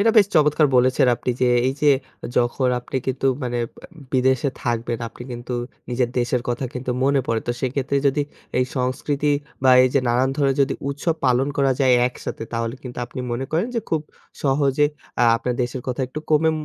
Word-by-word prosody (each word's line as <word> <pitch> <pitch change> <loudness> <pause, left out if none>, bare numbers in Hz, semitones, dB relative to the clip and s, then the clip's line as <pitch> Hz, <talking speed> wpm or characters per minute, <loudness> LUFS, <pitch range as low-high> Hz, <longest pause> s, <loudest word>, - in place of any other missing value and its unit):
এটা 225 +2 +5
বেশ 200 - +6
চমৎকার 150 0 +4
বলেছেন, 130 +1 +4
আপনি 125 - -2
যে 125 - +4 0.2
এই - - 0
যে 145 - +6 0.5
যখন 125 +2 +2
আপনি 130 - -5
কিন্তু 135 +1 -1 0.2
মানে 120 -1 -2 0.2
ব্যা - - -13 0.3
বিদেশে 130 +1 +2
থাকবেন 120 -1 -1
আপনি 120 - -11
কিন্তু 120 +1 -6 0.4
নিজের 120 0 0
দেশের 120 0 0
কথা 120 +2 -1
কিন্তু 125 0 -3
মনে 140 0 +3
পড়ে 115 -1 0
তো, 120 - +1
সেক্ষেত্রে 135 +2 -1
যদি 140 +2 +2 0.4
এই 125 - +3
সংস্কৃতি 140 +3 0 0.3
বা 130 - +7
এই 130 - +4
যে 140 - +5
নানান 125 +3 +2
ধরনের 135 -2 +2
যদি 135 - 0
উৎসব 145 +4 -1
পালন 130 +2 +3
করা 135 -1 +3
যায় 130 -2 +5
একসাথে, 125 - -7
তাহলে 115 +1 -2
কিন্তু 125 -2 -8
আপনি 130 +1 -7
মনে 125 +3 -2
করেন 170 +7 +1
যে 230 - +1
খুব 160 - +2 0.4
সহজে 140 +1 +3 0.3
আ - - +4
আপনার 125 +1 -2
দেশের 125 +1 -4
কথা 125 +1 -2
একটু 155 - -6
কমে 160 +1 +4
130 Hz, 190 wpm, -22 LUFS, 125-140 Hz, 0.5 s, বা